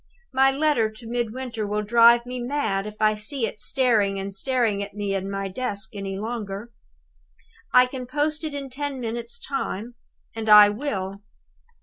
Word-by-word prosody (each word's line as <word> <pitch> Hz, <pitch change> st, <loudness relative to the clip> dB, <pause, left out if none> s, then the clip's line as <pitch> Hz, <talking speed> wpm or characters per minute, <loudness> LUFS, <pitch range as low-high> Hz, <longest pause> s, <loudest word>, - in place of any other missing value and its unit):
My 265 Hz, +1 st, +5 dB
letter 270 Hz, -5 st, +2 dB
to 215 Hz, +2 st, -13 dB
Midwinter 235 Hz, -1 st, -3 dB
will 210 Hz, +1 st, -1 dB
drive 235 Hz, +2 st, +6 dB
me 250 Hz, 0 st, -5 dB
mad 240 Hz, -6 st, -1 dB
if 210 Hz, -, -8 dB
I 215 Hz, 0 st, +4 dB
see 230 Hz, +4 st, 0 dB
it 215 Hz, -, -6 dB
staring 215 Hz, -6 st, +1 dB
and 195 Hz, +1 st, -5 dB
staring 225 Hz, -1 st, 0 dB
at 200 Hz, 0 st, -7 dB
me 205 Hz, -1 st, -2 dB
in 195 Hz, 0 st, -2 dB
my 195 Hz, 0 st, -3 dB
desk 200 Hz, -2 st, -4 dB
any 195 Hz, -1 st, -5 dB
longer. 215 Hz, 0 st, -5 dB, 1.0 s
I 250 Hz, 0 st, +7 dB
can 255 Hz, 0 st, -7 dB
post 300 Hz, +4 st, -1 dB
it 305 Hz, -2 st, -4 dB
in 275 Hz, -2 st, -6 dB
ten 280 Hz, 0 st, -4 dB
minutes' 235 Hz, 0 st, -4 dB
time 240 Hz, -4 st, -4 dB, 0.4 s
and 220 Hz, -1 st, -3 dB
I 210 Hz, -1 st, +10 dB
will! 200 Hz, -5 st, -4 dB
230 Hz, 165 wpm, -24 LUFS, 205-255 Hz, 1.0 s, I